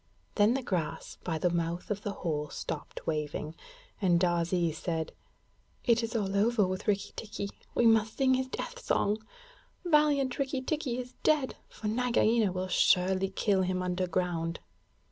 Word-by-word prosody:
Then 210 Hz, +3 st, +4 dB
the 270 Hz, -, -2 dB
grass 175 Hz, -8 st, -3 dB
by 165 Hz, -3 st, -1 dB
the 175 Hz, +2 st, +1 dB
mouth 170 Hz, +3 st, -2 dB
of 205 Hz, -1 st, -1 dB
the 205 Hz, -, -3 dB, 0.2 s
hole 150 Hz, -2 st, -1 dB
stopped -, -, -6 dB
waving, 150 Hz, 0 st, -2 dB, 0.5 s
and 175 Hz, -3 st, +4 dB
Darzee 175 Hz, -1 st, +1 dB
said: 160 Hz, 0 st, -3 dB, 0.7 s
'It 235 Hz, -2 st, +4 dB
is 230 Hz, 0 st, -4 dB
all 200 Hz, -3 st, 0 dB
over 215 Hz, +1 st, +3 dB
with 185 Hz, +3 st, -4 dB
Rikki 205 Hz, -1 st, 0 dB
tikki! 210 Hz, -2 st, -5 dB, 0.3 s
We 240 Hz, -, +3 dB
must 220 Hz, -1 st, +4 dB
sing 265 Hz, -1 st, +4 dB
his 260 Hz, 0 st, +1 dB
death 485 Hz, -, -5 dB
song. 210 Hz, +2 st, +1 dB, 0.7 s
Valiant 295 Hz, -5 st, +3 dB
Rikki 270 Hz, -1 st, -1 dB
tikki 280 Hz, -5 st, -1 dB
is 250 Hz, 0 st, -6 dB
dead! 295 Hz, -4 st, +2 dB
For 215 Hz, -, -6 dB
Nagaina 230 Hz, -2 st, +2 dB
will 185 Hz, +1 st, -2 dB
surely 185 Hz, +1 st, +3 dB
kill 195 Hz, 0 st, +1 dB
him 185 Hz, 0 st, 0 dB
underground.' 180 Hz, -2 st, -1 dB
200 Hz, 155 wpm, -30 LUFS, 175-240 Hz, 0.7 s, Then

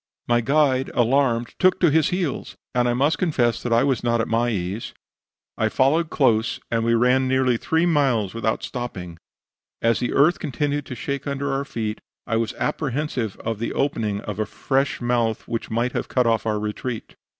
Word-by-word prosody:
My 120 Hz, 0 st, +3 dB
guide, 135 Hz, +1 st, +2 dB
alarmed, 120 Hz, -1 st, +2 dB
took 185 Hz, 0 st, +4 dB
to 170 Hz, -4 st, +4 dB
his 160 Hz, 0 st, +3 dB
heels; 180 Hz, -6 st, -2 dB, 0.2 s
and 125 Hz, -1 st, +2 dB
I 120 Hz, -, +1 dB
must 145 Hz, +4 st, +2 dB
confess 125 Hz, -10 st, +1 dB
that 120 Hz, -, -3 dB
I 115 Hz, +2 st, +4 dB
was 135 Hz, -5 st, 0 dB
not 120 Hz, -1 st, +1 dB
at 115 Hz, -, 0 dB
my 115 Hz, +1 st, +1 dB
ease. 100 Hz, 0 st, -3 dB, 0.6 s
I -, -, +2 dB
followed 155 Hz, +5 st, +2 dB
close, 115 Hz, -6 st, +2 dB
and 115 Hz, -1 st, +1 dB
we 115 Hz, 0 st, +3 dB
ran 125 Hz, +3 st, +3 dB
near 130 Hz, 0 st, +2 dB
three 160 Hz, +7 st, +1 dB
miles 135 Hz, -, +2 dB
without 110 Hz, -1 st, -1 dB
stopping; 90 Hz, -10 st, -6 dB, 0.6 s
as 115 Hz, 0 st, +2 dB
the 125 Hz, -, -1 dB
earth 170 Hz, +7 st, +4 dB
continued 145 Hz, -1 st, -2 dB
to 125 Hz, -, -6 dB
shake 140 Hz, +3 st, -4 dB
under 140 Hz, 0 st, -2 dB
our 135 Hz, +1 st, -1 dB
feet, 110 Hz, -5 st, -4 dB, 0.2 s
I 115 Hz, -, 0 dB
was 115 Hz, -1 st, -1 dB
apprehensive 140 Hz, -6 st, -2 dB
of 115 Hz, -2 st, -2 dB
the 115 Hz, -, -2 dB
opening 110 Hz, -7 st, -1 dB
of 105 Hz, -1 st, -6 dB
a 110 Hz, -, 0 dB
fresh 135 Hz, +5 st, -1 dB
mouth 120 Hz, -2 st, 0 dB
which 115 Hz, -, -3 dB
might 120 Hz, +3 st, 0 dB
have -, -, -3 dB
cut 125 Hz, -1 st, +1 dB
off 115 Hz, -1 st, +1 dB
our 105 Hz, -1 st, +1 dB
retreat. 110 Hz, +2 st, -5 dB
125 Hz, 190 wpm, -23 LUFS, 115-140 Hz, 0.6 s, took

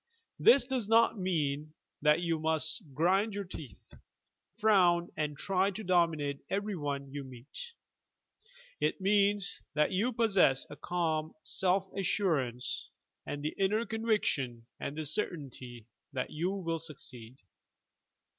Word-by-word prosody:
This 255 Hz, 0 st, +7 dB
does 250 Hz, -5 st, -2 dB
not 225 Hz, -1 st, +4 dB
mean 155 Hz, -4 st, -1 dB, 0.3 s
that 150 Hz, +2 st, +4 dB
you 165 Hz, -2 st, 0 dB
must 160 Hz, +3 st, -1 dB
grind 190 Hz, +9 st, +2 dB
your 205 Hz, -, -2 dB
teeth, 155 Hz, -, -11 dB, 0.6 s
frown 180 Hz, -6 st, +4 dB
and 150 Hz, -2 st, -2 dB
try 190 Hz, +3 st, +1 dB
to 205 Hz, +2 st, -6 dB
dominate 165 Hz, -6 st, +1 dB
every 205 Hz, +1 st, -1 dB
one 140 Hz, -3 st, -3 dB
you 145 Hz, -1 st, -4 dB
meet. 130 Hz, -, -9 dB, 1.1 s
It -, -, 0 dB
means 200 Hz, 0 st, +3 dB
that 150 Hz, 0 st, +3 dB
you 205 Hz, +7 st, +1 dB
possesa 200 Hz, -, +3 dB
a -, -, -6 dB
calm 160 Hz, -3 st, -1 dB
self 185 Hz, +4 st, +1 dB
assurance 160 Hz, -, 0 dB, 0.4 s
and 145 Hz, 0 st, -4 dB
the 155 Hz, -, -1 dB
inner 210 Hz, +4 st, +2 dB
conviction 205 Hz, -, 0 dB
and 145 Hz, -, -4 dB
certainty 135 Hz, -, -4 dB, 0.3 s
that 130 Hz, -2 st, -3 dB
you 165 Hz, +4 st, -1 dB
will 170 Hz, -4 st, -2 dB
succeed. 130 Hz, -6 st, -7 dB
170 Hz, 125 wpm, -31 LUFS, 145-200 Hz, 1.1 s, This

